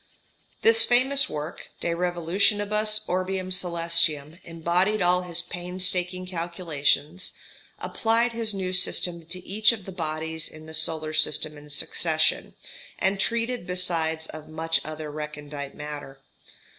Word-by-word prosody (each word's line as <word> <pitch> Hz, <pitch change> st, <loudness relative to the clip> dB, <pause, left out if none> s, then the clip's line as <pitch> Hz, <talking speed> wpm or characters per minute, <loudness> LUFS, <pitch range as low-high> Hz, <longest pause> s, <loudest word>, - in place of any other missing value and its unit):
This 455 Hz, +1 st, +7 dB
famous 265 Hz, +3 st, +3 dB
work, 150 Hz, +2 st, -6 dB
"De -, -, -1 dB
Revolutionibus 200 Hz, +5 st, +1 dB
Orbium 185 Hz, 0 st, -2 dB
Coelestium," 170 Hz, -3 st, +1 dB
embodied 175 Hz, +5 st, 0 dB
all 180 Hz, 0 st, +3 dB
his 175 Hz, -1 st, -4 dB
painstaking 180 Hz, 0 st, -2 dB
calculations, 170 Hz, -2 st, -1 dB, 0.4 s
applied 230 Hz, +2 st, +1 dB
his 230 Hz, -1 st, -1 dB
new 190 Hz, -2 st, -3 dB
system 175 Hz, -2 st, +3 dB
to 180 Hz, +1 st, -6 dB
each 215 Hz, +4 st, +4 dB
of 215 Hz, -5 st, -6 dB
the 195 Hz, -, -7 dB
bodies 160 Hz, -2 st, -3 dB
in 155 Hz, 0 st, -12 dB
the 160 Hz, -, -10 dB
solar 155 Hz, 0 st, 0 dB
system 155 Hz, -1 st, +4 dB
in 150 Hz, 0 st, -13 dB
succession, 155 Hz, +1 st, 0 dB, 0.4 s
and 195 Hz, +1 st, +1 dB
treated 230 Hz, +1 st, -1 dB
besides 165 Hz, -3 st, -1 dB
of 155 Hz, -1 st, -10 dB
much 165 Hz, +1 st, 0 dB
other 155 Hz, -1 st, -6 dB
recondite 150 Hz, -2 st, -7 dB
matter. 145 Hz, -2 st, -8 dB
175 Hz, 125 wpm, -26 LUFS, 155-190 Hz, 0.4 s, This